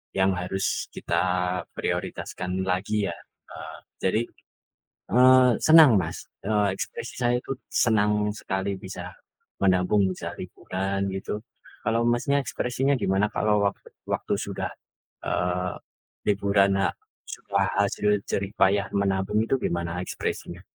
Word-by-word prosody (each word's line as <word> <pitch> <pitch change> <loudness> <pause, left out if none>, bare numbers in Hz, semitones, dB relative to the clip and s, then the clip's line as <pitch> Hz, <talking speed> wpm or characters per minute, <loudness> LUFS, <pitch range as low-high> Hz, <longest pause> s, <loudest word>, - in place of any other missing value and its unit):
Yang 95 0 +2
harus 95 +2 -2 0.3
kita - - -1 0.5
prioritaskan 95 +1 -3
lagi 100 +3 0
ya. 85 - -4 0.4
Eee, - - -8 0.3
jadi, 95 +4 +2 0.9
eee, 130 +2 +7
senang 155 -3 +9
Mas, 85 -1 -6 0.2
eee, 105 -2 +1
ekspresi - - -6
saya 120 -1 +2
itu 125 - -8 0.2
senang 105 -2 +2
sekali 95 -1 -2
bisa 90 -2 -8 0.5
menabung, 95 +1 +3
bisa 90 - -6
liburan 95 +1 -3
gitu. 95 +2 -4 0.5
Kalau 115 +1 +2
Masnya 120 +4 +2
ekspresinya 125 +5 0
gimana 95 0 +2
kalau 105 -1 +2
wak 100 - 0 0.3
waktu - - -1
sudah, - - -3 0.5
eee, 90 0 -1 0.5
liburan, 100 -1 +3
ha 95 - +2 0.4
setelah 100 -1 -1
hasil 100 +1 +1 0.2
jerih 100 0 -1
payah 100 +1 +4
menabung 100 +1 +1
itu - - +2
gimana 85 -6 -2
ekspresinya? - - -4
100 Hz, 120 wpm, -26 LUFS, 95-105 Hz, 0.9 s, senang